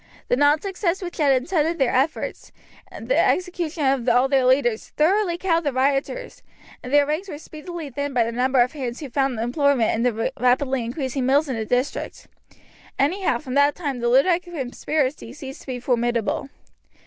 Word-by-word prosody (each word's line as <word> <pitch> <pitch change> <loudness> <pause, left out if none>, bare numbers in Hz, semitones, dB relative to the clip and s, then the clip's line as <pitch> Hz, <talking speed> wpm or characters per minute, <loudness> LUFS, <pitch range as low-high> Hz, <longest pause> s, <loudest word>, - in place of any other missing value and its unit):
The - - +4
non 290 +3 +4
success 385 -1 -2
which 350 - -6
had 275 -4 +3
attended 335 0 0
their 265 -5 +1
efforts, 270 +5 -1 0.4
and - - -9
the - - +2
execution 350 -4 0
of 265 -2 +2
all 250 +2 +4
their 270 -2 +2
leaders, 250 -3 +2
thoroughly 345 +3 +2
cowed 340 -2 +1
the 290 - 0
rioters, 275 - -1 0.4
and 250 - -8
their 290 0 +5
ranks 310 +7 -3
were 295 - -6
speedily 310 0 -8
thinned 285 +1 -4
by 240 - +4
the 230 - -3
number 255 +2 +2
of 245 +2 +2
hands 255 -5 -5
who 285 -5 -8
found 270 -3 0
employment 250 0 +2
in 225 - -1
the 230 -2 0
rapidly 255 +1 +2
increasing 260 +1 -3
mills 285 +3 +3
in 260 - -1
the 220 -1 -3
district. 250 +3 -2 0.7
Anyhow 360 +8 +1
from 265 -5 -7
that 285 +1 +3
time 285 -7 -3
the 240 0 0
Luddite 335 +8 +4
conspiracy 285 -5 -3
ceased 270 -1 -9
to - - -17
be 255 -2 -4
formidable. 240 0 -1
275 Hz, 185 wpm, -23 LUFS, 250-315 Hz, 0.7 s, their